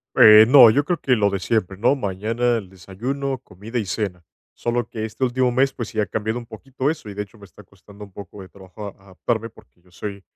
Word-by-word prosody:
Eh, 110 0 +9
no, 125 -2 +9
yo 140 +6 +2
creo 175 +2 -2
que 125 -2 +2
lo 100 -1 +2
de 100 - -2
siempre, 95 -3 -1
¿no?, 125 +6 +3
mañana 115 +3 -1
el 100 -4 -9
desayuno, 125 +9 -4
comida 110 +5 -7
y 105 - -2
cena. 95 -3 -3 0.3
Solo 120 -1 -2
que 110 -2 -5
este 110 +4 -3
último 125 0 +1
mes, 135 +2 +2
pues, 120 -3 -6
sí 110 - -2
ha 105 - 0
cambiado 110 +4 -3
un 120 - -8
poquito 130 +5 -4
eso 150 -9 -6
y, 100 - -8
de 105 - -3
hecho, 105 +2 -14
me 100 - -13
está 105 - -17
costando 100 +2 -15
un 100 - -17
poco 100 0 -10
de 95 - -13
trabajo 100 +2 -10
a - - -6
adaptarme, 110 +4 -3
porque 100 -4 -22
yo 90 0 -26
soy 100 +2 -7
110 Hz, 245 wpm, -22 LUFS, 100-120 Hz, 0.3 s, Eh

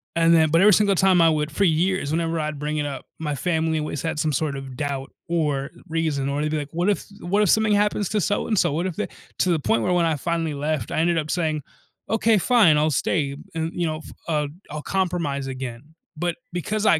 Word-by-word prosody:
and 165 0 +4
then 160 -1 +4
but 165 - +4
every 205 +2 +7
single 200 -1 +4
time 185 -1 +4
I 165 - +6
would 155 -1 0
for 200 - 0
years, 175 -2 +1
whenever 165 0 0
I'd 150 -1 -3
bring 150 +1 -2
it 150 - -1
up, 140 -2 -5
my 150 -2 -2
family 160 0 0
always 150 -2 -3
had 160 -1 -2
some 155 -1 0
sort 140 0 -1
of 135 -1 -8
doubt 140 -1 -3 0.2
or 150 -5 0 0.2
reason, 155 -4 -1
or 140 +1 -1
they'd 150 0 -1
be 155 - 0
like, 145 +1 -5
"What 175 +4 +1
if 205 - 0 0.2
what 195 +4 +1
if 200 - +2
something 220 -1 +4
happens 205 -1 +1
to 210 - 0
so 205 +2 0
and 215 - 0
so? - - +2
What 170 +4 -1
if 175 - -5
they" 210 - -1 0.3
to 185 - +2
the 165 - +2
point 115 -5 +1
where 180 - +1
when 175 -1 +3
I 160 -2 +1
finally 165 0 -1
left, 145 -4 -2
I - - 0
ended 170 +1 +2
up 155 0 -3
saying, 155 -4 0 0.5
"Okay, 225 0 +3
fine, 200 -7 +5
I'll 155 +1 +2
stay, 140 0 0 0.2
and, 160 0 -2
you 175 -2 -1
know, 155 - -2
f - - -12 0.2
uh, 150 -3 0 0.2
I'll 150 0 -5
compromise 170 -7 -1
again." 130 +3 -7 0.2
But 175 +1 -1 0.2
because 210 +5 -2
I 165 -6 +5
160 Hz, 245 wpm, -23 LUFS, 150-175 Hz, 0.5 s, every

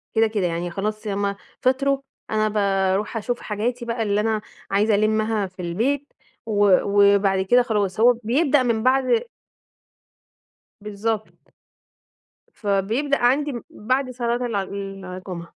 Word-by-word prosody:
كده، 225 0 +4
كده، 210 -4 -1
يعني 170 +1 -3
خلاص 215 +3 -3
يا 205 - -2
إمّا 200 0 -1 0.3
فطروا 275 +2 +2 0.3
أنا 215 0 +1
باروح 200 +1 0
أشوف 240 +3 -2
حاجاتي 235 +3 -3
بقى 230 -1 -2
اللي 205 0 +1
أنا 220 -1 0 0.3
عايزة 205 +2 +3
ألمّها 215 0 +1
في 185 0 -11
البيت 250 +12 -1 0.3
و 205 -4 +4
وبعد 200 -1 +4
كده 245 +5 +5
خلاص، 210 -4 -1
هو 245 +2 +6
بيبدأ 275 +3 +3
من 230 -2 0
بعد 265 - +3 1.6
بالضبط. 210 +1 -4 1.0
فبيبدأ 220 +8 0
عندي 275 +4 +2 0.2
بعد 255 +4 -1
صلاة 240 0 -1
الع 205 -5 -1
الجُمعة. 190 -3 -7
215 Hz, 125 wpm, -23 LUFS, 200-245 Hz, 1.6 s, هو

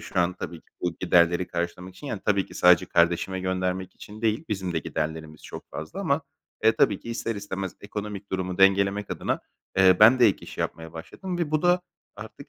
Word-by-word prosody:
şu - - -5
an 90 +1 +2
tabii 90 -1 -7
ki - - -34
bu 90 -1 -1
giderleri 85 0 +3
karşılamak 90 +2 -4
için 145 - -11
yani 110 -7 -4
tabii 100 -2 +2
ki - - -14
sadece 90 -1 +5
kardeşime 85 +2 +1
göndermek 95 0 -2
için 110 +2 -12
değil, 110 +7 +1
bizim 95 -4 -2
de 80 - 0
giderlerimiz 80 0 -4
çok - - -9
fazla 80 - -6
ama, 145 -5 +1 0.4
eee, 110 - +7
tabii - - +3
ki 115 - -7
ister 115 0 -2
istemez 95 -2 -5
ekonomik 105 -1 -6
durumu 95 -1 -2
dengelemek 100 +1 +3
adına, - - -2 0.4
eee, 95 -1 +6
ben 115 +5 +8
de 125 - +7
ek 100 - 0
iş - - -11
yapmaya 80 0 -4
başladım 175 - -6
ve 170 -4 -1
bu 155 +1 +1
da 180 0 +4 0.4
artık - - -10
95 Hz, 200 wpm, -26 LUFS, 90-105 Hz, 0.4 s, ben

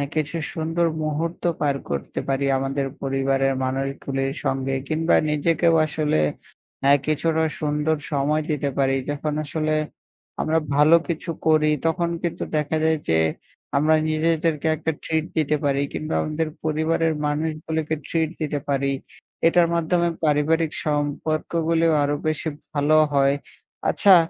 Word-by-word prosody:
কিছু 155 +2 -1 0.2
সুন্দর 165 0 0 0.2
মুহূর্ত 160 +3 -2 0.2
পার 145 -2 +2
করতে 70 -1 -3
পারি। 135 +1 +1
আমাদের 135 +1 -1 0.2
পরিবারের 135 0 +1
মানুষগুলির 135 +1 -2
সঙ্গে 135 0 0
কিংবা 160 +3 +2
নিজেকেও 165 +3 +2
আসলে 150 - 0 0.7
আ - - +8
কিছুটা 160 +1 +1 0.2
সুন্দর 150 +1 +1 0.2
সময় 150 +2 +1
দিতে 145 -2 0
পারি। 135 -1 +2
যখন 145 +1 -2
আসলে 155 +1 -1 0.7
আমরা 160 +1 +1 0.2
ভালো 150 +3 +6
কিছু 170 0 -4 0.2
করি 155 -1 +4 0.2
তখন 170 +1 0
কিন্তু 170 - -2
দেখা 150 +1 0
যায় 160 0 +3
যে, 80 - +4 0.6
আমরা 155 +2 +4
নিজেদেরকে 160 0 +1
একটা 160 - -2
ট্রিট 160 -1 0
দিতে 155 -1 +2
পারি 140 -1 +1
কিংবা 155 +1 -3
আমাদের 155 +1 -2 0.2
পরিবারের 160 +1 +1
মানুষগুলোকে 155 +1 -2
ট্রিট 160 -2 0
দিতে 150 -1 -1
পারি। 140 0 +1 0.6
এটার 170 0 +4
মাধ্যমে 170 +1 +1 0.2
পারিবারিক 155 +2 +2
সম্পর্কগুলো 155 +2 0 0.2
আরো 145 +1 +1
বেশি 155 +1 -1 0.2
ভালো 150 +1 +3 0.2
হয়। 140 0 +4 0.5
আচ্ছা, 195 -2 +6
155 Hz, 130 wpm, -23 LUFS, 140-160 Hz, 0.7 s, আ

